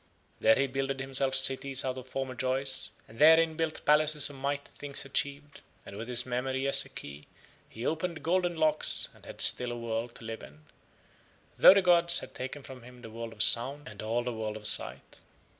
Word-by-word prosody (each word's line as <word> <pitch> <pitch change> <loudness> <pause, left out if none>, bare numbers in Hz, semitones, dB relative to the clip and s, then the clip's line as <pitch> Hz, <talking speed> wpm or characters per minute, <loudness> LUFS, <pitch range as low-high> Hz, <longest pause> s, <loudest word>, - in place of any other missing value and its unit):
There 110 0 +4
he 140 - 0
builded 135 0 -4
himself 135 0 +2
cities 135 0 +3
out 130 -1 -3
of 130 -1 -10
former 130 0 -5
joys, 130 +1 -1 0.2
and 115 +2 -16
therein 160 +1 +5
built 160 -1 -4
palaces 150 -1 +2
of - - -13
mighty 140 +1 -5
things 145 -1 -7
achieved, 140 +1 -4 0.2
and - - -11
with 110 +3 -8
his 125 -1 +1
memory 130 +2 -3
as 140 - +5
a - - -14
key 70 +1 -11 0.4
he 115 +3 -9
opened 165 +1 -4
golden 175 0 -1
locks 155 -1 0
and - - -20
had - - -9
still 125 -1 +5
a 120 - -6
world 115 0 -5
to - - -14
live 115 0 -7
in, 75 +3 -16 0.9
though - - +7
the 200 - +2
gods 170 -1 +4
had - - -6
taken 130 +2 -8
from 130 -1 -12
him 125 +1 -16
the 115 - -11
world 115 0 -8
of - - 0
sound 135 +5 +3
and 105 - -10
all 115 +3 -2
the 125 0 -5
world 110 -1 -5
of 105 - -11
sight. - - -1
130 Hz, 205 wpm, -28 LUFS, 120-145 Hz, 0.9 s, though